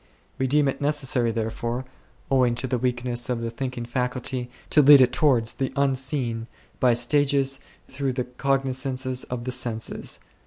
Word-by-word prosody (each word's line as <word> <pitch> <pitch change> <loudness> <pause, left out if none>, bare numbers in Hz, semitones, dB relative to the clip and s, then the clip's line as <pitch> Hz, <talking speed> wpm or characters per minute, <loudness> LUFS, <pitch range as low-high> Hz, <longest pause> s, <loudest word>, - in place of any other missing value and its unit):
We 130 - +1
deem 145 +2 +3
it 135 - -2
necessary 135 -5 +1
therefore, 115 +2 -3 0.5
owing 125 -3 +3
to 120 +2 -1
this 125 -2 -2
weak 125 -1 -1
ness 120 0 -1
of 125 -2 0
the 115 0 -3
thinking 125 -1 -4
faculty, 125 0 -2 0.2
to 150 - +6
lead 145 0 +9
it 125 -1 +4
towards 125 -7 +2
the 135 -1 -2
Unseen 135 -4 -1 0.3
by 125 -2 +4
stages 135 +2 +2 0.3
through 135 -1 -2
the 125 0 -1
cognizances 130 0 -1
of 125 -1 -5
the 125 - -3
senses. 120 -3 -2
130 Hz, 160 wpm, -25 LUFS, 120-135 Hz, 0.5 s, lead